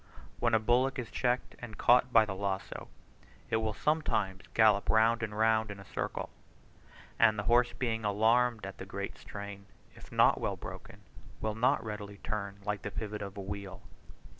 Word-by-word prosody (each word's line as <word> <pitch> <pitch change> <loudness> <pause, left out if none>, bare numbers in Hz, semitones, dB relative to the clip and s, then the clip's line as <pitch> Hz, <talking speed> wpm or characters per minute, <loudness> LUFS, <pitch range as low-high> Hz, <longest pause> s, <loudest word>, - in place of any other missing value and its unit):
When 120 -1 +3
a - - +4
bullock 125 +5 +2
is 125 -3 -5
checked 125 0 -1
and 110 -4 -9
caught 125 +1 +4
by 115 -2 +6
the 100 - -4
lazo, 95 0 -4 0.6
it - - +3
will 110 -1 -1
sometimes 150 -11 0
gallop 110 -3 +4
round 115 +1 +4
and 105 -2 -4
round 110 0 +3
in 100 -1 -7
a 100 - -11
circle, - - -4 0.9
and 110 -2 +5
the 105 - -2
horse 120 +3 +3
being 115 -3 -2
alarmed 110 +2 +2
at 100 -1 -8
the 95 - -6
great 100 +1 -5
strain, 100 -1 -8 0.3
if - - -15
not - - +4
well - - -1
broken, - - -10 0.4
will 110 -1 -1
not 125 +6 +2
readily 105 -2 -6
turn 100 -1 -4
like 105 -1 -2
the - - -4
pivot 105 +1 -5
of 100 0 -7
a - - -4
wheel. 100 0 -7
110 Hz, 180 wpm, -31 LUFS, 100-115 Hz, 0.9 s, by